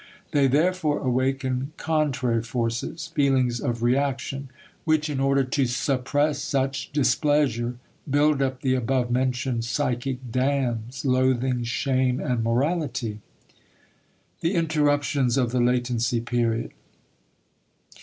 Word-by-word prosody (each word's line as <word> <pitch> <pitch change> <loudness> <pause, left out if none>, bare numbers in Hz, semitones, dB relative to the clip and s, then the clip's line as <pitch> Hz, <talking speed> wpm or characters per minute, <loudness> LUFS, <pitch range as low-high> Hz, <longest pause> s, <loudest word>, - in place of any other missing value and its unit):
They 140 -3 +4
therefore 155 +2 +2
awaken 130 +1 -1
contrary 140 -7 0
forces 120 +7 -3
(feelings 130 -5 +2
of 115 0 -2
reaction), 135 +1 0 0.3
which 155 -1 +1
in 135 - -2
order 135 0 +3
to 130 0 0
suppress 140 +4 0
such 135 -1 -1
displeasure, 145 -4 +1 0.3
build 145 0 +3
up 130 -1 -1
the 130 -1 +1
above 125 0 0
mentioned 125 -1 0
psychic 125 0 -2
dams: 125 -2 -1
loathing, 130 -1 +2
shame, 130 +1 0
and 125 -6 -1
morality. 125 -3 -1 1.2
*The 170 +4 0
Interruptions 145 -5 +1
of 125 -3 +1
the 125 -1 +1
Latency 120 0 +1
Period. 115 -1 -1
130 Hz, 105 wpm, -25 LUFS, 120-145 Hz, 1.2 s, They